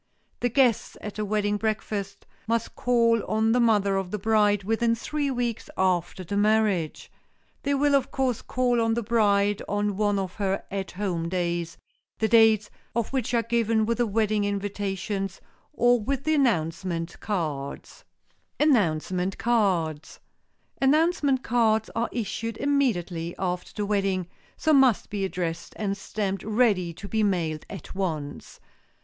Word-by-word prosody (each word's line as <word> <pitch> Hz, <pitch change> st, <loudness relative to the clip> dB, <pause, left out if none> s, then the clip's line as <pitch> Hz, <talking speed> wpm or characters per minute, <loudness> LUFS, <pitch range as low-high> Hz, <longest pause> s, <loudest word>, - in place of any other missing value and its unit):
The 245 Hz, -, +1 dB
guests 245 Hz, -2 st, +2 dB
at 210 Hz, 0 st, -7 dB
a -, -, 0 dB
wedding 205 Hz, 0 st, 0 dB
breakfast 210 Hz, -2 st, -3 dB, 0.2 s
must 230 Hz, 0 st, -1 dB
call 230 Hz, -2 st, +2 dB
on 220 Hz, +2 st, +2 dB
the 245 Hz, -, +3 dB
mother 205 Hz, -4 st, +3 dB
of 190 Hz, -2 st, -2 dB
the 210 Hz, -, -3 dB
bride 210 Hz, -1 st, +2 dB
within 230 Hz, +3 st, +1 dB
three 290 Hz, +5 st, -2 dB
weeks 245 Hz, -3 st, -2 dB
after 185 Hz, 0 st, 0 dB
the 185 Hz, +3 st, -4 dB
marriage. 205 Hz, -6 st, +1 dB, 0.5 s
They 280 Hz, 0 st, 0 dB
will, 285 Hz, +1 st, +2 dB
of 275 Hz, -1 st, +2 dB
course, 260 Hz, -4 st, -1 dB
call 245 Hz, -2 st, +1 dB
on 225 Hz, 0 st, +1 dB
the 235 Hz, -, -1 dB
bride 205 Hz, -2 st, +2 dB
on 205 Hz, 0 st, 0 dB
one 205 Hz, -1 st, +2 dB
of 190 Hz, -2 st, -3 dB
her 195 Hz, -2 st, -1 dB
"At 195 Hz, -1 st, -3 dB
Home" 180 Hz, -4 st, -2 dB
days, 170 Hz, -2 st, -2 dB, 0.4 s
the 220 Hz, -, +1 dB
dates 220 Hz, -1 st, +5 dB, 0.2 s
of 235 Hz, +2 st, -1 dB
which 250 Hz, -2 st, 0 dB
are 230 Hz, -, +2 dB
given 230 Hz, -1 st, +1 dB
with 235 Hz, +2 st, -1 dB
the 240 Hz, -, +2 dB
wedding 215 Hz, 0 st, +1 dB
invitations 200 Hz, -1 st, -3 dB, 0.3 s
or 245 Hz, -4 st, +3 dB
with 275 Hz, +4 st, -2 dB
the 315 Hz, -, +1 dB
announcement 170 Hz, -, 0 dB
cards. 150 Hz, -9 st, -4 dB, 0.6 s
[Sidenote: 295 Hz, -3 st, +5 dB
ANNOUNCEMENT 180 Hz, +3 st, -2 dB
CARDS] 185 Hz, -10 st, 0 dB, 0.6 s
Announcement 285 Hz, -1 st, +3 dB
cards 220 Hz, -2 st, +2 dB
are 230 Hz, +1 st, 0 dB
issued 230 Hz, 0 st, -3 dB
immediately 180 Hz, -12 st, 0 dB
after 180 Hz, -1 st, -3 dB
the 210 Hz, -, -3 dB
wedding, 195 Hz, -3 st, 0 dB, 0.3 s
so 315 Hz, -, +2 dB
must 265 Hz, -6 st, +4 dB
be 205 Hz, -1 st, -2 dB
addressed 175 Hz, -3 st, -3 dB
and 200 Hz, -2 st, -1 dB
stamped 195 Hz, -1 st, -3 dB
ready 210 Hz, -5 st, +2 dB
to 190 Hz, +4 st, -9 dB
be 220 Hz, +1 st, 0 dB
mailed 170 Hz, -7 st, -1 dB
at 195 Hz, -6 st, -8 dB
once. 160 Hz, -7 st, -4 dB
210 Hz, 150 wpm, -26 LUFS, 190-235 Hz, 0.6 s, dates